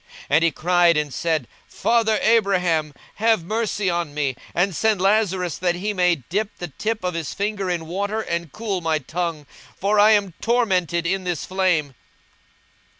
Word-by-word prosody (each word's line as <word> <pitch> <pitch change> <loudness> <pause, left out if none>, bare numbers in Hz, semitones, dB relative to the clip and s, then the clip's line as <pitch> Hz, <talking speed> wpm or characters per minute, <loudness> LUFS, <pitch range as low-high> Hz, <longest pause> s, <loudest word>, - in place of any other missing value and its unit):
42:016:024 - - -17
And 155 +3 +4
he 165 - +3
cried 175 0 +3
and 150 -3 -1
said, 160 -7 -1 0.2
Father 225 -2 +1
Abraham, 180 -9 +2 0.2
have 220 -4 +2
mercy 215 0 -1
on 170 -4 -1
me, 140 -4 -1 0.2
and 180 +1 +1
send 220 0 +2
Lazarus, 190 -3 +1
that 175 -1 +1
he 205 +4 -2
may 180 -2 +3
dip 185 - -3
the 175 - -6
tip 215 +9 -3
of 180 0 -1
his 165 -3 -4
finger 200 -2 -2
in 170 -2 -2
water, 200 +6 -2
and 170 -6 -3
cool 205 -2 -3
my 160 -1 +1
tongue; 160 +1 -4 0.3
for 205 +2 +2
I 215 +1 +7
am 200 -4 +1
tormented 185 -8 +1
in 190 +2 0
this 175 -4 -3
flame. 180 -7 0
180 Hz, 170 wpm, -22 LUFS, 165-205 Hz, 0.3 s, I